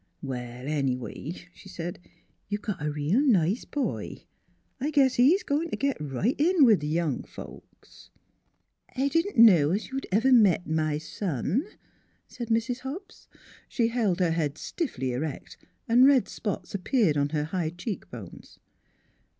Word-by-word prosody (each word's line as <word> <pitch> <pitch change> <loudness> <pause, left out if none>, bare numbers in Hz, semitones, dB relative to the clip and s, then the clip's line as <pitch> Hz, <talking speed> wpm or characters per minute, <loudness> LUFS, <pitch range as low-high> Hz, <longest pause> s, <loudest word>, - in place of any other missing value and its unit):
" - - -45
Well, 125 -1 -6
anyway," 140 +2 -2 0.2
she 190 - -15
said, 175 -1 -6 0.3
" - - -43
you've 205 0 -3
got 190 -8 -4
a 150 - 0
reel 150 - +1
nice 205 - +2
boy. 290 -2 -4 0.6
I 280 +4 -1
guess 275 -4 +3
he's 285 +12 +4
goin' 305 +4 -1
t' - - -3
git 275 -1 0
right 150 - -1
in 325 -1 +5
with 220 -5 +5
th' - - -4
young 160 -4 0
folks." - - -13 0.4
" - - -35
I 275 +2 +2
didn't 330 +4 0
know 185 -11 +7
as 200 +6 -2
you'd 270 +1 -4
ever 230 +7 +4
met 200 -7 +5
my 155 -1 0
son," 165 - -2 0.6
said 235 - -7
Mrs. 230 +2 0
Hobbs. 290 +10 -8 0.4
She 230 -2 +1
held 220 -7 0
her 175 -2 +2
head 155 -3 -1
stiffly 135 - -3
erect 145 +4 -5 0.3
and 245 +3 +6
red 275 -3 +4
spots 205 -3 -5
appeared 200 - +1
on 145 0 +1
her 150 0 -1
high 160 +1 -2
cheekbones. 165 - -8
195 Hz, 160 wpm, -27 LUFS, -, 0.6 s, know